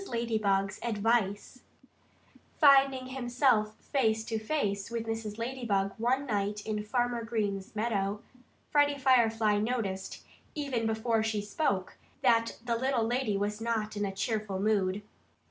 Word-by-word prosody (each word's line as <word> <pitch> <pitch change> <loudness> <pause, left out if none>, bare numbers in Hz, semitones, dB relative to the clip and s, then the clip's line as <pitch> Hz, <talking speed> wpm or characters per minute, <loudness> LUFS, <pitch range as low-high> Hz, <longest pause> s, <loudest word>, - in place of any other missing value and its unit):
LADYBUG'S 215 -5 0
ADVICE 225 0 0 1.0
Finding 275 -3 +6
himself 245 -4 +1
face 220 -5 +1
to 225 -1 -2
face 210 -5 -1
with 230 -1 -3
Mrs. 225 -2 -4
Ladybug 230 -5 -1
one 255 +4 +1
night 205 -3 -2
in 210 -1 -2
Farmer 240 +1 -1
Green's 210 -4 -3
meadow, 210 -1 -1 0.5
Freddie 290 -1 +3
Firefly 225 -5 +3
noticed, 210 -4 -3 0.3
even 265 -7 -1
before 220 0 +1
she 220 -1 -1
spoke, 205 -2 -2 0.3
that 230 -2 +3
the 235 -1 0
little 260 0 +1
lady 235 -3 0
was 210 +2 -2
not 220 -2 -1
in 205 - -2
a 200 - -1
cheerful 200 0 -2
mood. 200 -1 +1
225 Hz, 130 wpm, -30 LUFS, 205-245 Hz, 1.0 s, Finding